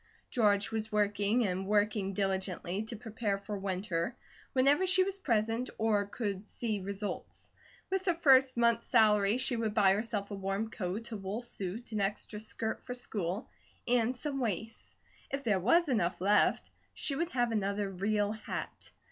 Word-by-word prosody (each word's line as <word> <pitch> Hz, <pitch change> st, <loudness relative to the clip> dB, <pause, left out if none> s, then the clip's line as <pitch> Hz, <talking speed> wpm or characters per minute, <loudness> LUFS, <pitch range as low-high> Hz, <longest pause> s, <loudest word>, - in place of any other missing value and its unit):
George 205 Hz, -4 st, +2 dB
was 220 Hz, -1 st, -3 dB
working 210 Hz, +2 st, +2 dB
and 190 Hz, 0 st, -2 dB
working 205 Hz, -1 st, +1 dB
diligently, 190 Hz, -1 st, -1 dB
to 220 Hz, +2 st, -5 dB
prepare 215 Hz, -2 st, -2 dB
for 200 Hz, +1 st, -6 dB
winter, 190 Hz, +1 st, -2 dB, 0.4 s
whenever 280 Hz, +8 st, +4 dB
she 370 Hz, 0 st, +6 dB
was 390 Hz, +1 st, -3 dB
present 230 Hz, -, 0 dB
or 210 Hz, -2 st, +1 dB
could 205 Hz, -2 st, -4 dB
see 220 Hz, -4 st, -2 dB
results. 200 Hz, +2 st, -5 dB, 0.4 s
With 385 Hz, 0 st, 0 dB
her 350 Hz, -3 st, +2 dB
first 265 Hz, -5 st, +5 dB
month's 235 Hz, -1 st, +3 dB
salary 210 Hz, -2 st, +4 dB
she 255 Hz, -1 st, 0 dB
would 220 Hz, -2 st, -2 dB
buy 195 Hz, -3 st, +5 dB
herself 210 Hz, -1 st, -2 dB
a -, -, -3 dB
warm 195 Hz, +3 st, -2 dB
coat, 210 Hz, +5 st, -4 dB
a 220 Hz, -, -3 dB
wool 200 Hz, +4 st, -4 dB
suit, 225 Hz, 0 st, -6 dB
an 215 Hz, -2 st, -1 dB
extra 210 Hz, +1 st, -2 dB
skirt 220 Hz, +1 st, -3 dB
for 250 Hz, -, -6 dB
school, 205 Hz, -4 st, -3 dB, 0.4 s
and 245 Hz, 0 st, +2 dB
some 275 Hz, +2 st, -3 dB
waists. 225 Hz, -1 st, -4 dB, 0.3 s
If 275 Hz, 0 st, -3 dB
there 210 Hz, -6 st, +2 dB
was 330 Hz, -, +4 dB
enough 205 Hz, -10 st, 0 dB
left, 205 Hz, +3 st, +3 dB, 0.2 s
she 290 Hz, -, 0 dB
would 335 Hz, +4 st, -1 dB
have 240 Hz, -2 st, +1 dB
another 200 Hz, -1 st, 0 dB
real 205 Hz, +2 st, 0 dB
hat. 220 Hz, 0 st, -6 dB
215 Hz, 165 wpm, -32 LUFS, 200-240 Hz, 0.4 s, she